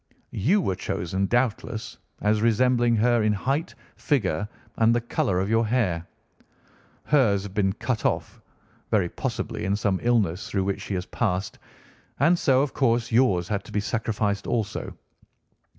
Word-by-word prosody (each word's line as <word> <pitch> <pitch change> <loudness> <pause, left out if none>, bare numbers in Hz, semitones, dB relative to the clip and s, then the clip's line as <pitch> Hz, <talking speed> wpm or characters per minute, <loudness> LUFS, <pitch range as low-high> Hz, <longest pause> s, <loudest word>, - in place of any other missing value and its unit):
You 180 - +2
were 95 - 0
chosen, 95 +3 -2
doubtless, 120 -1 -1 0.2
as 105 +1 +2
resembling 120 +1 +3
her 120 +1 +3
in 105 0 +2
height, 135 - -2 0.2
figure, 105 - 0 0.3
and 115 +1 +4
the - - +3
colour 100 -5 0
of 95 - 0
your 115 +1 +2
hair. 95 -8 0 1.0
Hers 110 -10 +3
had 100 -2 -8
been 100 -2 +1
cut 120 +1 -3
off, - - -2 0.5
very - - +2
possibly - - -4
in 100 +1 +1
some 100 -3 0
illness 105 -7 +1
through 95 -2 0
which 100 0 -2
she 100 - -4
has 90 0 -3
passed, 95 -5 -2 0.6
and 170 +6 +4
so, 135 -1 +3
of 145 - -3
course, 120 -3 +1
yours 105 -8 +3
had 100 -2 -1
to - - -12
be 105 - 0
sacrificed 105 -2 -1
also. 115 -4 -3
110 Hz, 155 wpm, -25 LUFS, 100-120 Hz, 1.0 s, and